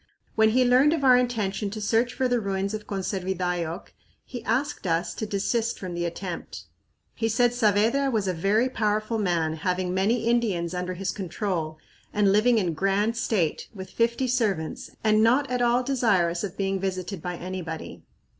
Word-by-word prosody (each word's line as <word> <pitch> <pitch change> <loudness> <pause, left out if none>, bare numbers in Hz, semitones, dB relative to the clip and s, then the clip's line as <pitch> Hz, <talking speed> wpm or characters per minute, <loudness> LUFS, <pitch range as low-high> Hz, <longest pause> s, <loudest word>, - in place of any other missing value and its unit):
When 220 0 +4
he 250 +3 +3
learned 260 +5 +5
of 315 -4 -2
our 255 -2 +7
intention 215 -5 0
to 215 +2 -6
search 225 +3 +1
for 260 - +1
the 245 -1 +1
ruins 195 -1 -2
of 215 -1 -5
Conservidayoc, 180 -3 -3 0.3
he 245 -3 -7
asked 245 -1 -1
us 165 +1 0
to 220 - -4
desist 225 +3 -1
from 185 -2 -6
the 175 0 -2
attempt. 170 +1 -6 0.5
He 225 -1 -1
said 240 +2 +3
Saavedra 230 +5 +2
was 215 -6 0
"a 185 - +1
very 200 +8 +2
powerful 215 -2 -1
man 165 -5 0
having 180 +2 -1
many 220 +5 +1
Indians 210 -8 +1
under 180 0 -3
his 195 +2 -2
control 175 -4 -3 0.3
and 205 -2 +3
living 225 +4 +4
in 180 -6 0
grand 195 +6 +1
state, 200 -8 -1
with 190 -1 -8
fifty 235 +4 +1
servants, 210 -10 -1
and 215 -1 +4
not 250 +6 +4
at 250 -1 0
all 240 +1 +3
desirous 200 -10 +1
of 195 -3 -5
being 195 -1 -1
visited 185 -1 -3
by 180 +1 -4
anybody." 175 -3 -6
205 Hz, 175 wpm, -26 LUFS, 185-235 Hz, 0.5 s, our